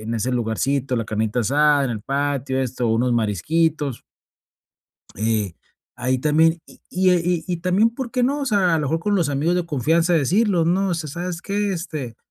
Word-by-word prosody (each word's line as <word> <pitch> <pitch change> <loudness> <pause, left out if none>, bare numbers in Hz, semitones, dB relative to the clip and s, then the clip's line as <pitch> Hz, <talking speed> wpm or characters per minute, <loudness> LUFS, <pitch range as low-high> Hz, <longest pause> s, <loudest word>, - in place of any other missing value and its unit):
en 115 +2 -4
ese 115 +3 -1
lugarcito, 125 +3 -1
la 115 - -1
carnita 110 +2 -1
asada, 145 +4 +3
en 130 - -2
el 110 -3 -4
patio, 135 0 -1
esto, 125 -2 -2
unos 120 +2 +1
marisquitos. 140 - 0 1.1
Eh, 105 -3 -1 0.4
ahí 130 +1 0
también, 160 +4 +3
y - - -18
y, 185 0 +2
eh, 180 -2 +3
y 175 -3 0
y 180 - -1
también, 185 +6 +2
¿por 240 0 -6
qué 250 0 0
no? 280 +4 +1
O 280 - -2
sea, 195 -7 +2
a - - +2
lo - - -1
mejor 160 +3 0
con 205 +3 0
los 175 -6 +1
amigos 145 +5 0
de 180 -1 -1
confianza 165 +4 +1
de 165 - +4
decirlos: 180 - +2
"No, 190 +3 +1
o - - +1
sea, 160 -2 -4
¿sabes 175 +1 -5
qué? 205 0 -1
Este, 150 -9 -5
150 Hz, 205 wpm, -22 LUFS, 125-180 Hz, 1.1 s, de